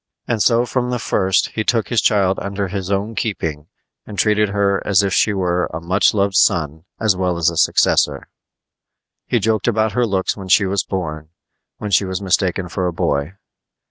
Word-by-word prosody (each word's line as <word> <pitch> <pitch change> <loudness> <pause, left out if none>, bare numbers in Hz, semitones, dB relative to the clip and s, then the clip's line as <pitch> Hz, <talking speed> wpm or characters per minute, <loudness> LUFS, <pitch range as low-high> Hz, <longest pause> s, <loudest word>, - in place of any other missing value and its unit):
And 115 -3 -1
so 115 +4 +3
from 125 0 -2
the 125 - -1
first 95 -4 +1
he 110 - -3
took 115 -1 0
his 120 - +2
child 100 -3 +2
under 100 -1 -4
his 95 -1 -4
own 100 +3 -1
keeping 80 -10 -3 0.4
and 105 - -10
treated 105 0 +2
her 100 -1 0
as 100 -1 +3
if 95 -2 -1
she 105 - +3
were 90 -3 0
a 80 - -5
much 95 +6 +1
loved 100 -1 +1
son 80 -5 +1
as 110 -3 +2
well 90 -1 -1
as 85 0 +2
a - - -8
successor. - - +2 1.0
He - - +1
joked 110 -1 0
about 110 -1 +1
her 125 0 0
looks 95 -2 -1
when 95 -2 -9
she 95 +2 +4
was 100 +1 0
born, 80 -5 -5 0.5
when 105 - -5
she 100 +1 +3
was 95 -1 -3
mistaken 95 -1 0
for 90 +1 -2
a - - -1
boy. 75 +1 -2
100 Hz, 195 wpm, -19 LUFS, 90-105 Hz, 1.0 s, she